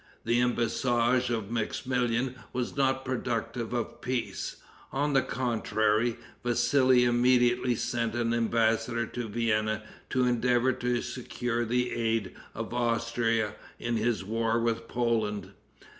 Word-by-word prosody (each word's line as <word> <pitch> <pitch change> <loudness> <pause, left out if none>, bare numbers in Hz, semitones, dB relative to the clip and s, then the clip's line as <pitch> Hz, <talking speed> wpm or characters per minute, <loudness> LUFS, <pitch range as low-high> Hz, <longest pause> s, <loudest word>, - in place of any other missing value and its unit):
The 120 +1 +3
embassage 120 +1 +1
of 110 -3 -2
Maximilian 120 +2 0 0.2
was 125 -1 -2
not 135 -1 +1
productive 120 -2 -2
of 120 -2 -3
peace. 125 -1 -3 0.4
On 145 +2 0
the 135 - +5
contrary, 115 -2 0 0.3
Vassili 130 +1 +4
immediately 120 0 +3
sent 115 0 -1
an 115 -1 +1
embassador 115 0 +1
to 120 +1 -5
Vienna 110 -1 0 0.3
to 130 -1 +2
endeavor 125 +1 +2
to 125 -1 -1
secure 120 -1 -3
the 125 +2 0
aid 115 -3 0 0.2
of - - -5
Austria 115 -2 +1 0.2
in 120 -1 -1
his 110 -1 0
war 115 +2 0
with 115 0 -1
Poland. 110 -5 -1
120 Hz, 120 wpm, -29 LUFS, 115-125 Hz, 0.4 s, the